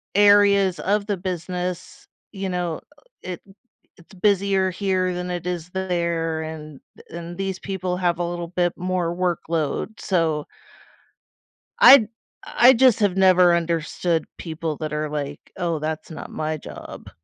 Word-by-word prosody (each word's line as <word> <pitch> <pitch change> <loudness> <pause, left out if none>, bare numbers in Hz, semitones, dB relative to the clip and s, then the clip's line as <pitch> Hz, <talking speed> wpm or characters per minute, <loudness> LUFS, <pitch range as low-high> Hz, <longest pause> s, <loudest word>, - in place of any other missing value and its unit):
areas 200 -2 +5
of 205 +1 0
the 205 -2 -1
business, 180 0 -5 0.2
you 195 -2 -4
know, 175 -3 -2 0.4
it 180 -1 -6 0.6
it's 175 +2 -19
busier 195 0 +2
here 185 -1 0
than 180 0 -4
it 175 -1 -4
is 175 -1 -4
there, 170 -3 -1
and 155 -3 -8 0.3
and 170 +1 -8
these 195 -1 -3
people 185 -2 -3
have 175 -2 0
a - - 0
little 175 0 -4
bit 175 -1 0
more 180 -2 -1
workload, 170 +2 -2
so 160 -5 0 1.3
I 280 - +9 0.4
I 245 +2 +6
just 255 -2 +4
have 200 -3 +2
never 185 -2 +5
understood 170 0 -1
people 160 -2 -4
that 155 -1 -5
are 150 0 -2
like, 145 -1 -4 0.2
"Oh, 170 -3 -1
that's 155 +2 -4
not 160 - -8
my 155 0 -3
job." - - -10
180 Hz, 140 wpm, -23 LUFS, 165-190 Hz, 1.3 s, I